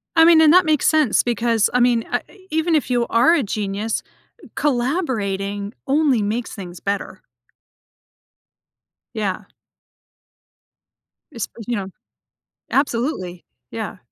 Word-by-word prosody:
I 325 0 +7
mean 330 -1 +7
and 310 0 +6
that 365 0 +6
makes 310 -3 +2
sense 310 -7 +3
because, 235 -2 +1
I 250 - +3
mean, 240 -2 +2
a - - 0 0.3
even 320 +1 +1
if 300 - 0
you 240 -1 +1
are 240 +8 +4
a 325 -5 +2
genius, 210 +1 -3 0.5
collaborating 220 - -1
only 275 -5 +2
makes 220 +4 -3
things 180 -4 -9
better. 200 0 -4 1.9
Yeah. 205 -4 -2 1.9
Espe 230 -6 -5 0.2
you 240 - -1
know? 195 -2 -4 0.8
Absolutely. 230 - -1 0.3
Yeah. 220 -4 -5
240 Hz, 115 wpm, -21 LUFS, 205-295 Hz, 1.9 s, I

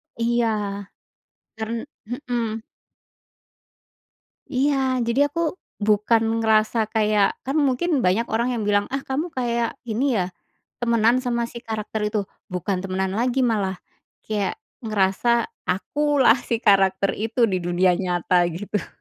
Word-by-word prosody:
Iya, 235 0 +1 1.1
karen 225 +1 -3 0.3
mhm. 235 -3 -3 1.9
Iya, 280 +2 +3 0.3
jadi 235 +4 0
aku 335 +4 -5 0.5
bukan 215 +2 +3 0.2
ngerasa 220 +1 +2 0.2
kayak, 210 -2 +3 0.2
kan 270 +3 -2
mungkin 285 +3 +1
banyak 205 +6 +2
orang 235 +2 +1
yang 220 - -2
bilang, 205 0 +3
"Ah, 275 - -3
kamu 285 +6 -2
kayak 235 -2 0
ini 240 +3 0
ya, 180 -1 -1 0.5
temenan 235 +1 +3
sama 240 -2 -1
si 235 - -8
karakter 220 0 -3
itu?" 210 0 -1 0.3
"Bukan 185 +1 -1
temenan 190 0 -2
lagi, 250 +2 +1
malah 195 -3 -1 0.5
kayak 210 -3 -1 0.3
ngerasa 215 - +1 0.2
akulah 270 +5 +3
si 230 - +1
karakter 195 -2 +4
itu 225 +2 0
di 185 - +1
dunia 175 +1 +2
nyata!" 175 -1 +2
gitu. 205 0 -3
225 Hz, 125 wpm, -23 LUFS, 200-240 Hz, 1.9 s, karakter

